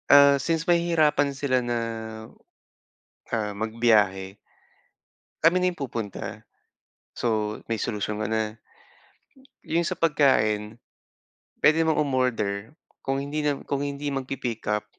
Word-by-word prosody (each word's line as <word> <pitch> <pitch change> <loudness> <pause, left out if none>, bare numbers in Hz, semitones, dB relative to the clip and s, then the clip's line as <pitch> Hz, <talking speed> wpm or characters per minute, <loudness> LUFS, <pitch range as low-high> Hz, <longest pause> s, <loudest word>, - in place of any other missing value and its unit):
Ah, 140 0 +8
since 165 +2 0
mahihirapan 165 -4 +3
sila 135 -2 +1
na 120 -1 -1 1.5
ah 105 -3 -1
magbiyahe 105 -3 +1 1.0
kami 165 +3 +5
na 180 - +1
yung 165 - -13
pupunta. 115 -6 -5 0.7
So, 110 -2 -1
may 115 - 0
solusyon 105 -1 -2
ka - - -1
na. 110 -1 -1 1.1
Yung 170 +1 +1
sa 170 - -2
pagkain 110 -9 +2 0.8
pwede 160 +2 +5
namang 160 -1 +2
umorder 115 -6 -1 0.3
kung 135 0 -1
hindi 145 +2 -3
nam 145 -2 -1
kung 140 -1 -1
hindi 145 0 -3
magpi-pickup, 120 -6 -3
130 Hz, 110 wpm, -25 LUFS, 110-145 Hz, 1.5 s, Ah